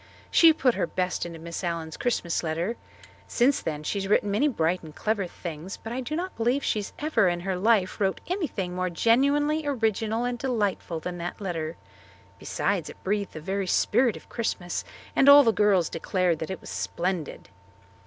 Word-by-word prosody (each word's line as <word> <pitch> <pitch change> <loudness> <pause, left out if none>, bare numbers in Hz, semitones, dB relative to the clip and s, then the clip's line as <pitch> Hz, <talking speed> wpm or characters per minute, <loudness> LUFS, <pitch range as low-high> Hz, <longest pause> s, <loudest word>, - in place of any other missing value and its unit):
She 330 -1 +8
put 265 -5 +2
her - - -1
best 180 -1 -2
into 170 -1 -8
Miss 170 +3 -6
Allen's 165 -2 -3
Christmas 180 -8 -1
letter. 170 +7 -2 0.5
Since 260 +3 +2
then 150 -1 -4
she 200 - -2
has 195 - -3
written 205 0 +2
many 220 +9 +3
bright 175 - 0
and 155 -2 -12
clever 210 -3 -1
things, 170 +1 -7
but 225 - -7
I 260 - -2
do 270 +5 -4
not 365 +3 -4
believe 245 +5 +1
she 210 - 0
ever 295 -10 +2
in 175 0 0
her 190 +1 -2
life 195 0 +2
wrote 190 -1 +1
anything 300 - -2
more 185 0 -1
genuinely 280 - +2
original 225 -4 0
and 245 -1 -2
delightful 205 -9 -1
than 175 +2 -5
that 175 +1 -5
letter. 165 -5 -4 0.6
Besides, - - -1
it - - -13
breathed 200 0 -1
the 155 - -7
very 195 +3 -2
spirit 240 +5 +2
of - - -15
Christmas, 185 -6 -3 0.3
and 275 - +6
all 285 0 +10
the 225 -3 +3
girls 200 -6 +3
declared 175 -1 0
that 160 - -4
it 190 - -5
was - - -9
splendid. 170 - -3
195 Hz, 185 wpm, -26 LUFS, 175-240 Hz, 0.6 s, all